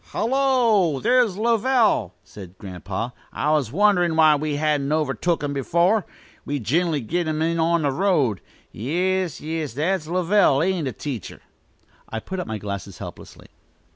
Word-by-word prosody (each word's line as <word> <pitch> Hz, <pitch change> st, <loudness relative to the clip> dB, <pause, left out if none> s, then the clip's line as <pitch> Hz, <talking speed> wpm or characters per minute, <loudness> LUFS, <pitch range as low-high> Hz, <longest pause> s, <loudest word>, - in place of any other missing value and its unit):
"Hullo, 230 Hz, -, +2 dB
there's 240 Hz, -, +2 dB
Lovell!" 225 Hz, -, +2 dB
exclaimed 95 Hz, -3 st, -12 dB
Grandpa. 95 Hz, +4 st, -5 dB, 0.2 s
"I 150 Hz, -, -1 dB
was 145 Hz, -7 st, +1 dB
wonderin' 180 Hz, -1 st, +3 dB
why 155 Hz, -1 st, +6 dB
we 150 Hz, 0 st, -2 dB
hadn't 145 Hz, -1 st, 0 dB
overtook 155 Hz, +2 st, 0 dB
him 145 Hz, -1 st, -2 dB
before. 170 Hz, -, +1 dB, 0.4 s
We 145 Hz, -, -3 dB
gin'ally 155 Hz, -, 0 dB
take 170 Hz, +8 st, -2 dB
him 155 Hz, -1 st, -1 dB
in 165 Hz, +1 st, 0 dB
on 165 Hz, 0 st, +2 dB
the 140 Hz, -, +1 dB
road. 145 Hz, -, +1 dB, 0.3 s
Yis, 180 Hz, -, -1 dB
yis; 155 Hz, -5 st, -4 dB
that's 160 Hz, +2 st, -1 dB
Lovell, 175 Hz, -4 st, +3 dB
ain't 180 Hz, -5 st, 0 dB
it, 130 Hz, -, -6 dB
teacher?" 130 Hz, -, -6 dB, 0.7 s
I 110 Hz, -, -4 dB
put 190 Hz, +11 st, -6 dB
up 180 Hz, -, -4 dB
my 110 Hz, -, -3 dB
glasses, 100 Hz, -2 st, -6 dB
helplessly. -, -, -10 dB
160 Hz, 150 wpm, -23 LUFS, 135-185 Hz, 0.7 s, why